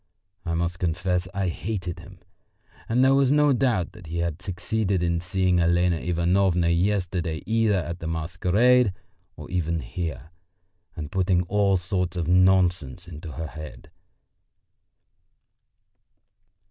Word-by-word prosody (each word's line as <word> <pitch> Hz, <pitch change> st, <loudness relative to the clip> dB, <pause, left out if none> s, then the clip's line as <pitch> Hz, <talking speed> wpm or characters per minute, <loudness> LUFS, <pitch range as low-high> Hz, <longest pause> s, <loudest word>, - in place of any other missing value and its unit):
I 85 Hz, -1 st, -1 dB
must 85 Hz, +1 st, -2 dB
confess 90 Hz, +1 st, -1 dB
I 95 Hz, -2 st, -1 dB
hated 90 Hz, 0 st, -4 dB
him -, -, -13 dB, 0.7 s
and 125 Hz, +3 st, +3 dB
there 135 Hz, +1 st, +5 dB
was 135 Hz, -1 st, +3 dB
no 150 Hz, -1 st, +4 dB
doubt 120 Hz, -9 st, +1 dB
that 90 Hz, -, -13 dB
he 85 Hz, +2 st, -5 dB
had 85 Hz, 0 st, -2 dB
succeeded 95 Hz, 0 st, -1 dB
in 85 Hz, -1 st, 0 dB
seeing 90 Hz, 0 st, +1 dB
Elena 85 Hz, 0 st, +2 dB
Ivanovna 90 Hz, +1 st, +1 dB
yesterday 90 Hz, -2 st, 0 dB
either 110 Hz, -2 st, +2 dB
at 85 Hz, -1 st, -3 dB
the 80 Hz, -, -5 dB
masquerade 90 Hz, +8 st, +2 dB, 0.4 s
or -, -, -9 dB
even 85 Hz, -2 st, -1 dB
here, 80 Hz, +3 st, -5 dB, 0.6 s
and 75 Hz, -4 st, -6 dB
putting 95 Hz, -1 st, +1 dB
all 100 Hz, +1 st, +2 dB
sorts 90 Hz, 0 st, -2 dB
of 85 Hz, -2 st, -2 dB
nonsense 90 Hz, -3 st, +2 dB
into 80 Hz, -2 st, -8 dB
her 80 Hz, -, -5 dB
head. 75 Hz, -1 st, -10 dB
90 Hz, 130 wpm, -25 LUFS, 85-95 Hz, 0.7 s, there